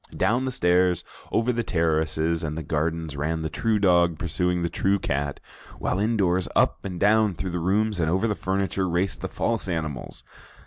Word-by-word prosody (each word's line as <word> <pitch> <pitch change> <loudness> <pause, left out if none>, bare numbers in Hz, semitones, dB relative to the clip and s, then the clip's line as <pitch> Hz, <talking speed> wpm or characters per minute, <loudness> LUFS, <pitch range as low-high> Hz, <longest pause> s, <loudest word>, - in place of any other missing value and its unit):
Down 115 +7 +2
the 130 - -1
stairs, 90 -4 +2 0.3
over 115 +2 +1
the 120 - 0
terraces 80 -3 0
and 75 0 -3
the 80 - -4
gardens 80 0 -2
ran 80 +3 -2
the 80 - -3
true 110 -1 +1
dog, 85 -4 +3
pursuing 90 0 -1
the - - +1
true 100 +1 +1
cat, 70 -6 -2 0.4
while 90 - -1
indoors, 95 -5 +1
up - - +2
and 90 -3 -5
down 105 -1 +3
through 95 +2 -4
the 90 - -2
rooms 100 +3 +1
and 80 -2 +1
over 95 +6 +1
the 105 - +1
furniture, 95 -1 -1
raced 90 +2 0
the - - -2
false 115 -4 -1
animals. 80 -6 -4
90 Hz, 185 wpm, -25 LUFS, 80-100 Hz, 0.4 s, dog